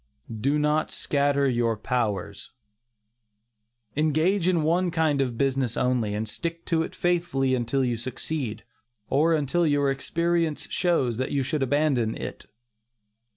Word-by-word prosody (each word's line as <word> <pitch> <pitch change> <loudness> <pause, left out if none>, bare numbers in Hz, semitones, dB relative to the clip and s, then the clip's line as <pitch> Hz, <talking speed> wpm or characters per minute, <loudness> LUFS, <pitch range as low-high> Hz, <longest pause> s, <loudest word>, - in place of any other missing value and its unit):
DO 140 +5 +2
NOT 150 +1 +1
SCATTER 140 -1 +1
YOUR 120 -3 +1
POWERS. 105 -4 -3 1.4
Engage 155 +5 +2
in 175 -4 +2
one 175 +3 +2
kind 160 -4 +1
of 125 -4 -2
business 135 -3 0
only, 120 -5 +1
and 110 +1 -2
stick 170 +8 -5
to 165 -2 +1
it 160 - -4
faithfully 170 -7 +1
until 130 +2 0
you 120 -2 -1
succeed, 130 0 -4 0.5
or 160 +3 +4
until 160 +3 +1
your 145 -2 +2
experience 170 +2 -1
shows 135 -10 +1
that 130 - -2
you 140 -1 +1
should 145 +2 -2
abandon 135 -4 +1
it. - - -7
140 Hz, 135 wpm, -26 LUFS, 125-160 Hz, 1.4 s, or